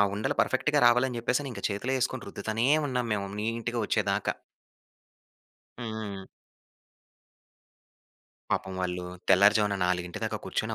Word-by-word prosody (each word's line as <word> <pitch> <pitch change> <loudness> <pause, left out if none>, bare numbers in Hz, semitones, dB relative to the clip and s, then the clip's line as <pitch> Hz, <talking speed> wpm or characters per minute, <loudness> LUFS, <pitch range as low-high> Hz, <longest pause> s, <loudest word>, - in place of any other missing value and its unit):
ఆ - - +8
ఉండలు 105 +2 -1
పర్ఫెక్ట్‌గా - - +2
రావాలని 125 0 +3
జెప్పేసని 125 +4 0
ఇంక 100 -4 -8
చేతిలో 110 +7 -1
యేసుకొని 125 - -2
రుద్దుతానే 115 +4 -1 0.2
ఉన్నాం 125 -3 -1
మేము 100 -1 -4
నీట్‌గా 115 +2 -2
వచ్చేదాకా. - - 0 1.4
హ్మ్. 110 -5 -5 2.3
పాపం 95 0 -1
వాళ్ళూ 90 -1 -2 0.2
తెల్లారుజామున 105 +1 +5
నాలుగింటి 90 -1 -2
దాక - - -1
కూర్చొని - - -2
110 Hz, 110 wpm, -28 LUFS, 100-120 Hz, 2.3 s, ఆ